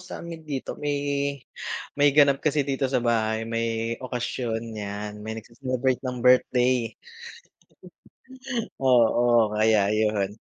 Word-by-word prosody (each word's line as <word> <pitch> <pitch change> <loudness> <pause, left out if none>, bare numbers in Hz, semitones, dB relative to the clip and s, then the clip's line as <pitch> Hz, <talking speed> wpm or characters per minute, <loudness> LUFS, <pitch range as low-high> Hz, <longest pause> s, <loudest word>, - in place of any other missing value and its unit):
sa'min 170 -2 -8
dito 135 -3 -3
may 145 -1 -1 1.0
may 145 0 +4
ganap 140 -2 +5
kasi 150 -2 +1
dito 135 -1 -1
sa 130 - 0
bahay, 110 -1 +1
may 115 0 -2
okasyon 120 -2 -3 0.2
yan 105 +1 -6
may 110 +1 -6
nagce-celebrate 125 +3 -2
ng 125 -2 -5
birthday. 125 -1 +3 1.8
Oo, 120 -3 +4
kaya 110 0 +4
ayun. 105 -1 0
120 Hz, 110 wpm, -25 LUFS, 110-130 Hz, 1.8 s, ganap